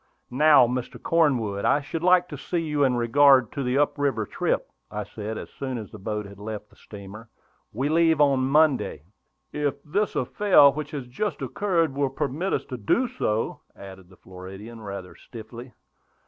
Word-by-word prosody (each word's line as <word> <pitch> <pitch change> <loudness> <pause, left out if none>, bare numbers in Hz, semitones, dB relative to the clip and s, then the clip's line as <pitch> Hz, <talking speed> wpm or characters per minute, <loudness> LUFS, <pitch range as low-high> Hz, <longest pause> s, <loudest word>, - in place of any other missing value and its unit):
"Now, 145 0 +6
Mr. 125 +1 -4
Cornwood, 125 -12 +1
I - - +3
should 150 +3 -5
like 180 0 +4
to - - -6
see 175 - -4
you 150 -3 0
in 130 -2 +3
regard 130 +1 +4
to 140 - -4
the 125 0 0
up 145 0 +1
river 135 -7 0
trip," - - -1 0.2
I 105 0 -4
said, 105 +1 -6
as - - -8
soon 130 -2 -5
as 110 -3 -8
the 110 - -10
boat 105 +1 -4
had 100 0 -12
left 105 0 -7
the - - -21
steamer. 105 +2 -11 0.4
"We 130 +6 -2
leave 160 0 +3
on 140 -3 +4
Monday." 150 - +2 0.5
"If 145 -1 -1
this 200 +8 -1
affair 145 +1 +5
which 150 +1 -5
has 145 -4 -6
just 165 +13 -4
occurred 170 -7 0
will 140 0 0
permit 150 +7 -3
us - - -1
to 125 - -5
do 175 - +1
so," 115 - -2
added 95 -2 -12
the 95 - -18
Floridian, 95 +5 -11
rather 100 -3 -7
stiffly. 120 +2 -11
130 Hz, 180 wpm, -25 LUFS, 110-150 Hz, 0.5 s, Now